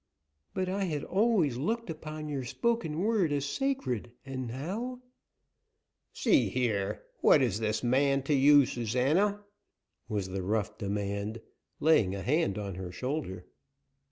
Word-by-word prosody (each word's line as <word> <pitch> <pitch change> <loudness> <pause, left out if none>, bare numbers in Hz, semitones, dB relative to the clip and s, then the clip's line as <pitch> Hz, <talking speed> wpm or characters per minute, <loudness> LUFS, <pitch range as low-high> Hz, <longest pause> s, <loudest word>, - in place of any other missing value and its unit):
"But 185 -1 0
I 195 +1 -1
had 150 -5 -2
always 190 - +2
looked 230 - -1
upon 155 -1 -6
your 140 -3 -3
spoken 170 - -1
word 205 -6 +2
as 140 -1 0
sacred, 140 - -2
and 130 -2 -4
now 195 - -4 0.6
" - - -53
"See 130 - +4
here, 105 -4 -1 0.2
what 140 - +6
is 110 -5 0
this 110 +1 -1
man 135 +2 +2
to 150 - 0
you, 145 0 +7
Susana?" 140 - +1 0.7
was 100 -3 -2
the 95 +1 -3
rough 105 +2 -1
demand, 100 +2 -2 0.4
laying 115 -12 +4
a 95 - -5
hand 145 - +1
on 100 -2 -4
her 90 0 -6
shoulder. 125 - -4
135 Hz, 140 wpm, -30 LUFS, 110-165 Hz, 0.7 s, you